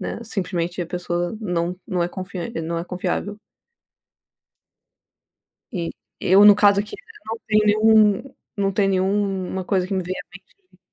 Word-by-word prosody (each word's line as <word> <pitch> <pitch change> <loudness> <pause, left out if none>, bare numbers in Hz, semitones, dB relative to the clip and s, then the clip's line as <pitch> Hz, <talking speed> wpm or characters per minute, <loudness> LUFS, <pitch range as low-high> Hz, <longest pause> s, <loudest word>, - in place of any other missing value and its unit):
né, - - -4
simplesmente 180 -4 -2
a 170 - -6
pessoa 175 +2 -3
não 180 -2 -2
não 180 -2 -1
é 170 - 0
confian 185 +2 -6
não 170 +1 -3
é 170 - -3
confiável. 205 +3 -3 2.3
E 170 -3 -3 0.3
eu, 195 +1 +5
no 205 -1 +9
caso, 205 -1 +5
aqui 210 +1 -4 0.3
não 225 +1 -4
tem 215 0 +4
nenhum 215 -1 +5 0.4
eu 200 - 0
não 195 - +1
tem 195 0 +2
nenhuma 190 -1 0
coisa 185 -1 0
que 195 - -3
me 185 -1 -1
venha 185 +2 -4
a - - -22
mente 370 - -19
190 Hz, 160 wpm, -22 LUFS, 180-205 Hz, 2.3 s, no